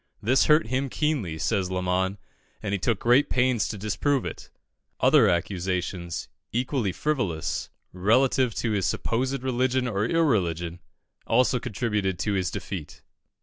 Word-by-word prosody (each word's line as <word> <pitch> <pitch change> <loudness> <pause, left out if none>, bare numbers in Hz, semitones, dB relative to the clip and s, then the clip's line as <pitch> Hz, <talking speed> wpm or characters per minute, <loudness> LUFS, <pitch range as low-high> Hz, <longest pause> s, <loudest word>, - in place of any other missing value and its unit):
This 130 +5 +3
hurt 155 +1 +5
him 135 +2 0
keenly," 130 - -1
says 95 +3 0
Lamon, 95 +1 0 0.5
"and 100 -2 -2
he 100 - 0
took 115 +3 +1
great 125 +7 +3
pains 125 -3 +2
to 105 - -5
disprove 110 +7 0
it." - - -7 0.5
Other 130 -4 +5
accusations, 90 -1 -2 0.2
equally 125 -3 0
frivolous, 100 - -2 0.2
relative 120 +5 +2
to 115 - -1
his 100 -3 +1
supposed 130 +3 -1
religion 130 0 +1
or 105 -2 0
irreligion, 90 - +1 0.5
also 125 +2 +3
contributed 105 -4 -1
to 105 +3 -1
his 95 -2 0
defeat. 90 -7 -7
110 Hz, 135 wpm, -26 LUFS, 95-130 Hz, 0.5 s, hurt